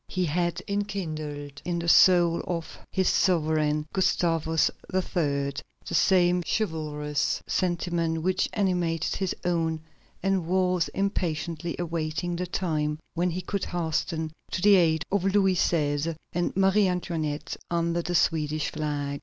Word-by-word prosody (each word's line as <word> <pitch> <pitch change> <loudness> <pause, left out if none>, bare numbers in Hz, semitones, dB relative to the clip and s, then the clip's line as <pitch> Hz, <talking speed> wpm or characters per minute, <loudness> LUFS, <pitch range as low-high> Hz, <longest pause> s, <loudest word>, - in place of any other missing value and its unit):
He 185 -1 -1
had 175 +2 -1
enkindled 155 -8 -4
in 175 -1 -2
the 170 0 -3
soul 175 -1 +6
of 170 -2 -4
his 190 -2 +1
sovereign, 155 -4 +2
Gustavus 165 -4 +2 0.2
III., 185 -1 0 0.8
the - - -6
same 180 -2 +4
chivalrous 150 -7 -1
sentiment 170 -2 -1
which 185 +1 +1
animated 175 -5 0
his 190 -2 -1
own, 165 -2 0 0.4
and 190 -3 +1
was 180 -1 +2
impatiently 170 -4 -2
awaiting 165 0 -2
the 180 +1 -3
time 155 -4 -1 0.2
when 175 +1 +1
he 180 +2 -3
could 200 -1 -2
hasten 160 -1 -2 0.2
to 185 - -3
the 205 0 +7
aid 165 -4 +3
of 200 -2 +1
Louis 195 -1 +3
XVI. 155 -2 +1 0.2
and 175 +2 -1
Marie 195 +1 +4
Antoinette 160 -5 -2
under 170 0 0
the 175 +1 -3
Swedish 155 -2 +1
flag. 145 -2 -3
170 Hz, 130 wpm, -27 LUFS, 155-185 Hz, 0.8 s, the